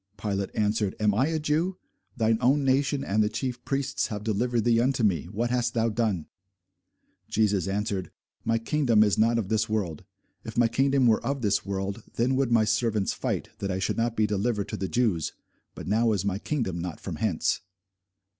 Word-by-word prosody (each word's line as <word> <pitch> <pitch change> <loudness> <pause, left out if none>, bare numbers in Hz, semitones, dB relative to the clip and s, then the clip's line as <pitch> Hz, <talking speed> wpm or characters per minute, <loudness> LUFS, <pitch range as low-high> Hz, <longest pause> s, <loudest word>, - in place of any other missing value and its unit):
Pilate 100 -1 -2
answered, 105 -1 0
Am 105 -1 +3
I 130 +7 +2
a 160 0 0
Jew? 155 +5 0 0.4
Thine 110 -1 +2
own 135 +4 +3
nation 135 +1 +1
and 110 -4 +1
the 105 - +2
chief 125 -1 -4
priests 140 0 -1
have 105 -1 -5
delivered 115 +2 0
thee 115 0 +3
unto 125 -1 +1
me: 95 -7 +2
what 110 +7 -2
hast 120 -1 0
thou 115 0 +2
done? 105 -7 -1 1.0
Jesus 100 -5 +1
answered, 100 -1 -2 0.3
My 115 - +1
kingdom 115 -2 +3
is 105 -2 +1
not 115 +2 +4
of 105 -5 -2
this 110 0 +1
world: 95 -7 -2 0.4
if 110 0 -8
my 120 -1 +5
kingdom 135 +2 +2
were 110 -2 +3
of 140 -2 -2
this 105 -1 +1
world, 100 +2 -3
then 125 +3 +1
would 130 -2 +1
my 115 -2 +4
servants 110 -2 +1
fight, - - -3
that 100 - -2
I 95 - -1
should 95 - -1
not 115 0 0
be 110 - +3
delivered 105 0 -1
to - - -4
the 95 - -3
Jews: 105 -10 0 0.4
but - - -8
now 110 +3 +2
is 100 -2 -1
my 100 -1 -1
kingdom 110 - -2
not 85 -3 -5
from 85 -5 -6
hence. 90 -2 0
110 Hz, 195 wpm, -27 LUFS, 100-120 Hz, 1.0 s, my